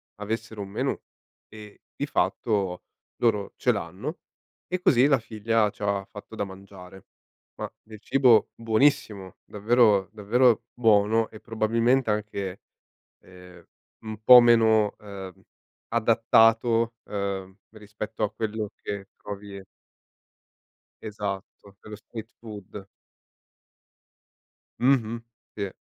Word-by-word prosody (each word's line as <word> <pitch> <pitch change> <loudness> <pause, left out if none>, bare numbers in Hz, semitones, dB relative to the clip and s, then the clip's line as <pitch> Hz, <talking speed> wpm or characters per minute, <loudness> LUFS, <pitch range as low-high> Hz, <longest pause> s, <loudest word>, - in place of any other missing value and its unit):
avessero 110 +1 -5
un 100 - -7
menù - - -2 0.5
e 105 -1 -13
di - - -2
fatto 95 -5 -1 0.4
loro 105 -4 +1
ce - - +2
l'hanno, - - -5 0.5
e 180 0 -3
così 130 -4 +4
la 135 -2 +3
figlia 110 -1 0
c'ha 100 -2 -2
fatto 105 +2 -11
da 100 - -2
mangiare. 95 -1 -12 0.5
Ma - - -4
del 110 -1 -12
cibo 125 -3 +4
buonissimo, 110 -5 0
davvero 105 -2 +3
davvero 115 +3 +3
buono 110 -1 +3
e 110 - -13
probabilmente 115 +3 +1
anche, 100 -3 -3 0.6
ehm, 90 -1 -16 0.4
un 110 0 -7
po' 125 +2 +10
meno, 110 -3 +4
ehm, 95 -3 -10 0.5
adattato, 115 0 +3
ehm, 100 -2 -4 0.2
rispetto 105 +1 -8
a 105 - -2
quello 110 -1 -3
che 100 -1 -5
trovi 100 -1 -8 1.4
Esatto, 100 -1 -7
quello 105 -1 -10
street-food. 105 -3 -10 1.9
Mh-mh. 120 -3 +2 0.3
Sì. 100 -2 -2
110 Hz, 100 wpm, -26 LUFS, 100-115 Hz, 1.9 s, po